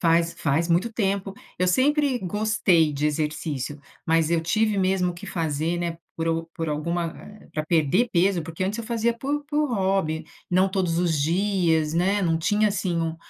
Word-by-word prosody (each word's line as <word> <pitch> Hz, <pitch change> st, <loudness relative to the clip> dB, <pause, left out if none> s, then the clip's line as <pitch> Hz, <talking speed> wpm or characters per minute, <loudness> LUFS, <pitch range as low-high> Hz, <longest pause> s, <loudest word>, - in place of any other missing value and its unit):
Faz 170 Hz, 0 st, +2 dB
faz 160 Hz, +3 st, 0 dB
muito 180 Hz, +7 st, +1 dB
tempo. 195 Hz, -3 st, -1 dB, 0.3 s
Eu 185 Hz, -, +2 dB
sempre 280 Hz, -, +2 dB
gostei 190 Hz, -5 st, +2 dB
de 145 Hz, +1 st, 0 dB
exercício. 150 Hz, -2 st, -3 dB, 0.3 s
Mas 165 Hz, 0 st, +2 dB
eu 170 Hz, -1 st, +2 dB
tive 215 Hz, +5 st, +1 dB
mesmo 185 Hz, -1 st, +1 dB
que 170 Hz, -, -10 dB
fazer, 160 Hz, +1 st, -1 dB
né, 170 Hz, -1 st, -3 dB, 0.2 s
por 165 Hz, 0 st, -1 dB
u 165 Hz, 0 st, 0 dB
por 165 Hz, -2 st, -3 dB
alguma, 170 Hz, +3 st, -1 dB
eh, 210 Hz, 0 st, -14 dB
pra 155 Hz, -, -2 dB
perder 170 Hz, -, +2 dB
peso, 180 Hz, 0 st, +2 dB
porque 165 Hz, +3 st, -6 dB
antes 205 Hz, +4 st, -2 dB
eu 230 Hz, -, -4 dB
fazia 235 Hz, 0 st, 0 dB
por 285 Hz, +4 st, -2 dB
por 300 Hz, 0 st, 0 dB
hobby, 190 Hz, -6 st, 0 dB, 0.3 s
não 185 Hz, +2 st, +3 dB
todos 185 Hz, -3 st, 0 dB
os 170 Hz, -3 st, +1 dB
dias, 165 Hz, -2 st, +1 dB
né, 190 Hz, +4 st, +2 dB
não 165 Hz, -3 st, +2 dB
tinha, 210 Hz, +5 st, +2 dB
assim, 190 Hz, -4 st, -1 dB
um 165 Hz, 0 st, -2 dB
175 Hz, 180 wpm, -24 LUFS, 165-205 Hz, 0.3 s, não